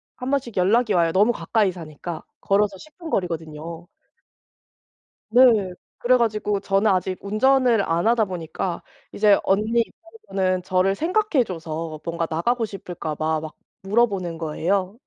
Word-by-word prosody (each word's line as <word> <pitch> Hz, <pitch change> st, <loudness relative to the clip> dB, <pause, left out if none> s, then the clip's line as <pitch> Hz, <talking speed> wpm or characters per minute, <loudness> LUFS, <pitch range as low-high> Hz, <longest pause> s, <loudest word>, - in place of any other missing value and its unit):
1 255 Hz, +1 st, -5 dB
번씩 255 Hz, -5 st, -1 dB
연락이 210 Hz, +4 st, +3 dB
와요, 170 Hz, -2 st, +3 dB
너무 210 Hz, +6 st, +3 dB
가까이 205 Hz, +2 st, +1 dB
사니까. 165 Hz, 0 st, -8 dB, 0.2 s
걸어서 200 Hz, 0 st, +1 dB
10 310 Hz, -, -16 dB
분 335 Hz, -2 st, -8 dB
거리거든요. 165 Hz, -, -4 dB, 1.4 s
네. 225 Hz, -6 st, +5 dB, 0.3 s
그래 255 Hz, +1 st, +4 dB
가지고 210 Hz, -3 st, 0 dB
저는 200 Hz, +2 st, +2 dB
아직 185 Hz, 0 st, 0 dB
운전을 240 Hz, +2 st, +3 dB
안 170 Hz, +2 st, 0 dB
하다 230 Hz, -2 st, +3 dB
보니까 175 Hz, 0 st, -4 dB, 0.3 s
이제 205 Hz, -1 st, +4 dB
언니 215 Hz, +4 st, +2 dB
입장에서는 195 Hz, -, -3 dB
저를 185 Hz, +1 st, +1 dB
생각해 350 Hz, -, +1 dB
줘서 165 Hz, -4 st, -5 dB
뭔가 170 Hz, 0 st, -2 dB
나가고 230 Hz, +9 st, 0 dB
싶을까 180 Hz, -6 st, -6 dB
봐 155 Hz, 0 st, 0 dB
막 155 Hz, 0 st, -8 dB, 0.3 s
물어보는 195 Hz, -5 st, 0 dB
거예요. 185 Hz, +6 st, -1 dB
195 Hz, 305 characters per minute, -23 LUFS, 170-230 Hz, 1.4 s, 네